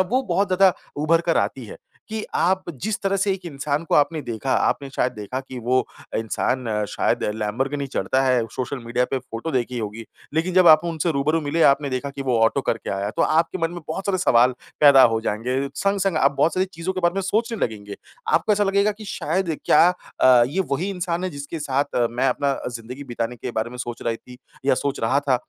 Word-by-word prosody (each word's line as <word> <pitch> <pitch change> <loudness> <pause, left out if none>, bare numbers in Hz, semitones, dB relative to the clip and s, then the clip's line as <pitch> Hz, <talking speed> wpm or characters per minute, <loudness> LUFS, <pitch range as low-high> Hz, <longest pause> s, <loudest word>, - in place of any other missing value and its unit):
वो 240 +8 +1
बहुत 195 -2 +1
ज़्यादा 185 0 +5 0.3
उभर 165 +2 +3
कर 170 -1 0
आती 130 - -1
हैं, 105 - -10 0.3
कि 220 0 -4
आप 190 +2 +1
जिस 200 +8 -3
तरह 195 0 +1
से 195 +1 +1
एक 190 -1 -6
इंसान 145 0 -2
को - - 0
आपने 150 +2 +3
देखा 120 +1 -3
आपने 140 - +1
शायद 125 -1 0
देखा 105 +4 -5
कि 130 -1 -9
वो 125 +2 +1 0.4
इंसान 120 +3 -1 0.2
शायद - - 0
लैम्बोर्गिनी 135 +7 -2
चढ़ता 130 0 0
है 125 -3 +2
सोशल 130 +2 -4
मीडिया 120 +2 0
पे 135 - 0
फ़ोटो 115 +6 -6
देखी 125 -2 -1
होगी। 110 +1 -5 0.3
लेकिन 170 +3 0
जब 185 -1 +5
आप 155 0 +8
उनसे 165 0 -1
रूबरू 150 +4 +1
मिले 155 +2 0
आपने 140 0 +4
देखा 130 +2 -3
कि 140 0 -6
वो 125 -3 +1
ऑटो 115 +5 +3
करके 115 -3 -2
आया 100 0 -2
है - - -2
तो - - +2
आपके 165 +3 +1
मन 165 -1 0
में 175 0 -7
बहुत 190 +5 -4
सारे 190 -2 +1
सवाल 125 -7 +4 0.3
पैदा 140 -3 +8
हो 115 -2 +4
जाएँगे, 125 +6 -2
संग-संग 195 0 0
आप 140 -2 +3
बहुत 155 +3 +3
सारी 185 - +2
चीज़ों 165 +3 -3
के 185 - -4
बारे 175 0 +2
में 195 - 0
सोचने 225 +3 -1
लगेंगे। 105 -2 -6 0.3
आपको 215 - +3
ऐसा 205 0 +2
लगेगा 200 +1 +2
कि 215 +1 -12
शायद 170 -3 -2
क्या 165 - +6 0.3
अ, 125 -2 +7
ये 185 +7 -1
वही 170 +8 -1
इंसान 180 -1 -2
है 185 - -2
जिसके 145 +2 -6
साथ 140 -1 0 0.3
मैं 125 +3 +1
अपना 140 +2 0
अ, - - -4
ज़िंदगी 125 +3 -8
बिताने 120 -1 -4
के - - -5
बारे 110 +2 -2
में 125 - -9
सोच 120 -1 -5
रही 115 -1 -1
थी 125 +2 -15 0.3
या 135 - +4
सोच 140 +1 -2
रहा 130 +5 +2
था। 140 -3 +1
140 Hz, 225 wpm, -23 LUFS, 125-175 Hz, 0.4 s, आप